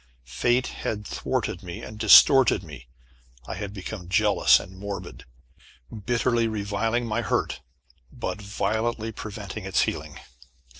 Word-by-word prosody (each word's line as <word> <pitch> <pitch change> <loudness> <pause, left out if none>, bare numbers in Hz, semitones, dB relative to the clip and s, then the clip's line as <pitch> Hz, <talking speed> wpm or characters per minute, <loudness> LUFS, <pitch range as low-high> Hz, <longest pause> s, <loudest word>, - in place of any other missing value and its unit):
Fate 120 - +1
had 105 -1 -4
thwarted - - -3
me, 85 -1 -8
and 105 0 -9
distorted 115 0 +7
me. 70 -7 -11 0.6
I - - -4
had 100 +1 -5
become 95 -2 -7
jealous 90 - +4
and 95 - -11
morbid, 100 0 -7 0.8
bitterly 120 -1 +2
reviling 110 +3 -1
my 115 +1 -1
hurt, - - -1 0.5
but 105 - -5
violently 110 +3 -2
preventing 105 -1 -7
its 95 0 +1
healing. - - -3
105 Hz, 120 wpm, -25 LUFS, 95-115 Hz, 0.8 s, distorted